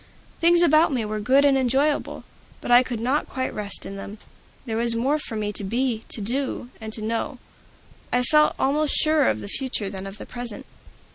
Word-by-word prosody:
Things 345 +1 +5
about 310 -1 +4
me 245 -5 -1
were 215 0 -3
good 265 +6 +3
and 280 -1 +4
enjoyable, 270 +3 0 0.4
but - - -5
I 245 +1 +8
could 250 -3 -4
not 260 +6 0
quite 260 -1 -3
rest 205 -2 -3
in 195 - -7
them; 200 +2 -8 0.5
there 225 -3 -3
was 235 0 +1
more 270 +6 +1
for 230 - -5
me 210 -1 -2
to 205 - -2
be, 230 +2 -1
to 220 - -3
know, 250 +3 -3
and 220 0 -6
to 220 - -6
do. 230 +4 -2 0.7
I 250 0 +2
felt 300 +4 +4
almost 295 +2 +1
surer 310 -3 +3
of - - -2
the - - -7
future 225 -4 -1
than 195 -1 -6
of 195 +1 -9
the - - -9
present. 240 -3 -6
245 Hz, 205 wpm, -23 LUFS, 215-280 Hz, 0.7 s, I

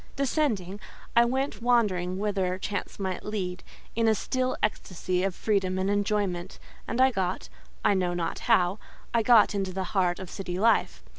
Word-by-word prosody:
Descending, 240 - -1 0.4
I 235 0 +6
went 265 +1 -2
wandering 200 -7 +1
whither 195 -3 -1
chance 200 +2 -4
might 190 -2 -3
lead, 190 -4 -4 0.3
in 230 0 +2
a 220 - +4
still 255 +3 -1
ecstasy 185 -3 -1
of 195 -2 -1
freedom 195 -3 0
and 190 +1 0
enjoyment; 205 -3 -1 0.3
and 235 - -2
I 260 0 +6
got—I 65 - -2
know 180 -2 0
not 170 -1 -2
how—I 220 +2 0
got 225 -2 +5
into 195 -2 -2
the 190 +1 -3
heart 180 -3 +2
of 185 -2 -8
city 180 -2 -5
life. 225 +4 +2
195 Hz, 155 wpm, -27 LUFS, 180-225 Hz, 0.4 s, I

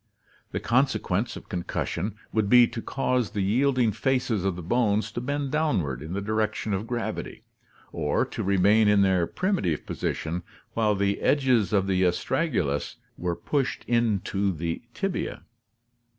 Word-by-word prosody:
The - - -2
consequence 120 -4 +1
of - - -10
concussion 95 +3 -3 0.2
would 110 -2 +1
be 125 +1 +8
to 115 0 -5
cause 125 -3 0
the 105 -2 -2
yielding 125 +3 +2
faces 125 -3 0
of 95 -2 0
the 90 - -7
bones 110 +2 +1
to 120 - -4
bend 140 +1 -2
downward 100 - 0
in 80 +3 -6
the 100 +1 -2
direc 110 +1 0
tion 105 - -3
of 100 +4 -2
gravity, 120 -1 -4 0.5
or - - 0
to - - -5
remain 100 +3 +4
in 105 -1 +5
their 95 -3 +2
primitive 180 - -1
position 85 +2 -3 0.3
while 110 -2 +2
the 100 0 0
edges 130 -7 +3
of 100 -2 +2
the 95 -1 +1
astragalus 90 - 0 0.2
were 90 -1 -2
pushed 135 - -1
into 105 -4 +1
the 85 -1 -3
tibia. 195 -2 -3
105 Hz, 150 wpm, -26 LUFS, 95-125 Hz, 0.5 s, be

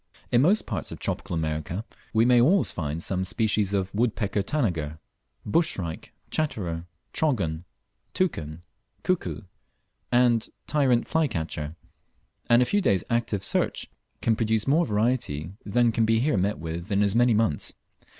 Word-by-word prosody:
In 120 - +5
most 190 +9 +3
parts - - -4
of - - -6
tropical 95 -3 -3
America 80 +5 -2 0.3
we 110 0 +3
may 120 -1 +6
always 175 +10 +4
find 80 0 -3
some 95 -1 -1
species 105 0 0
of 95 -1 -1
woodpecker 105 -2 0
tanager, 90 - -1 0.5
bush 165 +10 +2
shrike, 85 -4 -6 0.2
chatterer, 90 - -2 0.3
trogon, 95 - 0 0.5
toucan, 85 - -2 0.4
cuckoo, 185 -9 -1 0.7
and 120 -2 +3 0.2
tyrant 130 -5 +2
flycatcher; 80 - -1 0.7
and 120 +1 +6
a - - 0
few 205 +10 +1
days' 100 - +2
active 115 -4 0
search - - -1 0.3
will 115 - +4
produce 110 -1 +1
more 155 +5 +3
variety 105 - 0
than 120 +3 +3
can 115 0 +2
be 115 0 +3
here 130 +4 +2
met 100 +2 +1
with 85 +5 -6
in 100 +1 +3
as 100 -1 +2
many 120 0 +4
months. 105 -9 +1
110 Hz, 145 wpm, -26 LUFS, 90-120 Hz, 0.7 s, may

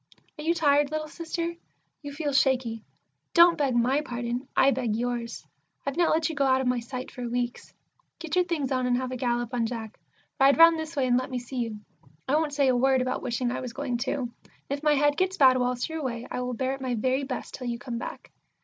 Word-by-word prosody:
Are - - -5
you 335 +2 +2
tired, 290 -3 +3
little 310 0 -3
Sister? 335 +1 -4 0.5
You 285 -2 -7
feel 290 0 -3
shaky. 255 -5 +1 0.5
Don't 340 0 +8
beg 280 -6 0
my 255 +5 +2
pardon; 245 -1 -4
I 275 - +6
beg 235 -4 -1
yours. 240 0 -3 0.4
I've 275 - -2
not 345 0 +3
let 315 +1 +2
you 325 - -3
go 285 -2 0
out 260 0 +4
of 265 - -1
my 250 -1 +1
sight 255 +2 -6
for 245 -2 -5
weeks. 245 0 -3 0.5
Get 330 -1 -4
your 360 0 +3
things 310 -6 -2
on, 255 -1 +1
and 245 0 +2
have 255 0 -3
a - - -3
gallop 240 -1 -1
on 235 -2 +1
Jack. 225 -2 -7 0.4
Ride 275 +1 +5
round 330 0 +7
this 315 +1 -6
way 275 -2 +1
and 245 -1 +3
let 255 - -5
me 255 - -3
see 245 +2 -7
you. 230 -3 -2 0.5
I 265 - 0
won't 310 0 +2
say 280 -1 +3
a 255 - +3
word 260 +1 +3
about 255 - -2
wishing 240 0 -1
I - - -3
was 250 -2 -6
going 265 -3 -2
too; 275 +2 -1 0.2
and - - -25 0.2
if 280 0 -2
my 300 -1 +3
head 290 +1 +2
gets 375 +1 0
bad 260 -2 +6
whilst 250 0 0
you're 320 -1 -5
away, 240 -4 -4
I 250 - -2
will 250 0 -3
bear 260 +3 -1
it 270 - -7
my 255 -2 -1
very 260 +4 0
best 265 -2 -5
till 255 - -6
you 235 -1 -2
come 240 -1 -5
back. - - -8
260 Hz, 245 wpm, -27 LUFS, 245-290 Hz, 0.5 s, Don't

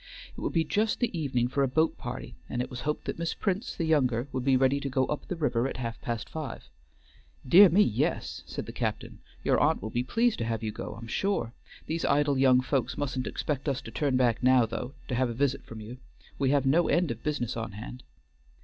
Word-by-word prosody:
It - - -8
would - - -1
be 165 - +3
just 215 +7 0
the 235 -6 0
evening 130 -7 0
for 140 +3 -1
a 135 - +3
boat 160 +5 +2
party, - - -6 0.2
and 120 - -3
it 125 - -2
was 125 - -6
hoped 150 +3 -2
that - - -4
Miss 165 -1 -2
Prince 200 +3 -2
the 165 - -1
younger 130 -6 +2
would 130 -1 -2
be 135 0 +4
ready 135 +2 +3
to 140 - -3
go 130 0 +1
up 150 - -4
the 180 - -3
river 135 -6 +1
at - - -5
half 115 -2 -5
past 115 -3 -3
five. 155 -3 -6 0.8
"Dear 185 +8 +9
me, 195 +6 +5
yes," 110 - -1
said - - -5
the - - -7
captain; - - -3 0.2
"your - - +3
aunt - - +3
will 110 +4 -6
be 120 - 0
pleased 230 - +1
to 115 - -1
have 115 -1 -2
you 110 - -1
go, 105 - -7
I'm 115 - -8
sure. 120 - -1 0.3
These 165 +1 -2
idle 145 -1 +2
young 130 -1 +5
folks 130 -2 -1
mustn't 135 -3 -2
expect 145 -1 -2
us 135 - -1
to 115 - -9
turn 140 -2 +1
back 120 -3 +2
now, 130 -1 +5
though, 115 +3 -5
to - - -3
have 125 0 +1
a - - -3
visit 140 +1 0
from 115 - -8
you. 115 +4 -8 0.4
We 135 -2 +2
have 140 -1 +2
no 160 +6 +4
end 175 -5 +2
of 115 - -6
business 145 -6 -2
on 115 -3 -4
hand." 120 +4 -8
130 Hz, 240 wpm, -28 LUFS, 120-150 Hz, 0.8 s, Dear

